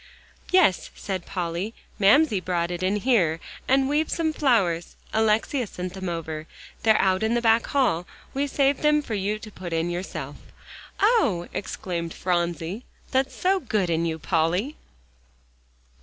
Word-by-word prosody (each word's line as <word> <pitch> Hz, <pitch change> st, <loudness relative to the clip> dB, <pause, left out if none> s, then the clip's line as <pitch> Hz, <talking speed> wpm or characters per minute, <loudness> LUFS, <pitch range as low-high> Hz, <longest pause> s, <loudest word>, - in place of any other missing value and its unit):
"Yes," 365 Hz, -, +4 dB
said 190 Hz, -3 st, -5 dB
Polly; 180 Hz, +4 st, -3 dB, 0.2 s
"Mamsie 215 Hz, +2 st, +5 dB
brought 175 Hz, -1 st, -1 dB
it 175 Hz, 0 st, -4 dB
in 185 Hz, +2 st, +1 dB
here. 200 Hz, -8 st, +2 dB, 0.3 s
And 265 Hz, 0 st, +3 dB
we've 300 Hz, +2 st, +1 dB
some 320 Hz, -2 st, 0 dB
flowers; 195 Hz, -, +1 dB, 0.2 s
Alexia 220 Hz, +3 st, +2 dB
sent 180 Hz, -1 st, -6 dB
them 190 Hz, -1 st, -4 dB
over. 160 Hz, -2 st, -5 dB, 0.3 s
They're 220 Hz, -1 st, +4 dB
out 190 Hz, -1 st, +2 dB
in 220 Hz, +2 st, +1 dB
the -, -, +3 dB
back 225 Hz, 0 st, +3 dB
hall; 180 Hz, -12 st, +1 dB, 0.3 s
we 280 Hz, +2 st, 0 dB
saved 275 Hz, 0 st, +1 dB
them 300 Hz, 0 st, +3 dB
for 230 Hz, -, -5 dB
you 205 Hz, +1 st, -1 dB
to 215 Hz, 0 st, -11 dB
put 180 Hz, -3 st, -7 dB
in 165 Hz, +1 st, 0 dB
yourself." 155 Hz, -6 st, -5 dB, 0.6 s
"Oh!" 405 Hz, -, +3 dB
exclaimed 170 Hz, -3 st, -4 dB
Phronsie, 175 Hz, +3 st, -1 dB, 0.3 s
"that's 265 Hz, +1 st, +1 dB
so 380 Hz, +1 st, +2 dB
good 210 Hz, -, 0 dB
in 165 Hz, +1 st, +1 dB
you, 160 Hz, -1 st, -2 dB
Polly." 175 Hz, -, 0 dB
195 Hz, 150 wpm, -25 LUFS, 170-260 Hz, 0.6 s, Mamsie